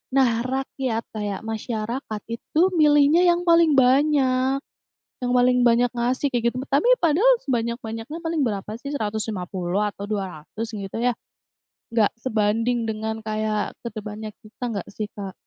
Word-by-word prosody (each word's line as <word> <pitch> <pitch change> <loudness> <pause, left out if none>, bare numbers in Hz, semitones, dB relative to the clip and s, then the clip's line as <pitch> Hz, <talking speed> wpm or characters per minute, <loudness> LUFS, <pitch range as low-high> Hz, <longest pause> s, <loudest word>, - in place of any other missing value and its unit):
Nah, 265 -3 +5 0.2
rakyat 260 -3 -2
kayak 205 -2 -3
masyarakat, 220 0 -4
itu 305 +7 -1 0.2
milihnya 295 +2 +5
yang 345 0 +2
paling 335 -2 +6
banyak 265 0 +3 0.6
yang 245 - 0
paling 250 0 +4
banyak 235 +1 +3
ngasih, 245 +4 0
kayak 235 -1 +2
gitu. - - -6
Tapi 285 - +2 0.2
padahal 390 +11 +5
sebanyak-banyaknya, 235 +2 -3
paling 325 -1 0
berapa 205 -1 -4
sih? 280 - -6
Rp150.000 205 -4 -2
atau 200 - -7
Rp200.000 205 +3 -5
gitu 200 0 -5
ya? 245 0 +2 0.8
Enggak 225 -3 +3
sebanding 225 +1 +1
dengan 220 0 -3
kayak 215 -1 -1
ke 235 - -3
depannya 215 0 -6
kita 215 +3 -12
enggak 200 - -4
sih, 215 -1 -3
Kak? 195 -2 -6
230 Hz, 140 wpm, -23 LUFS, 215-265 Hz, 0.8 s, paling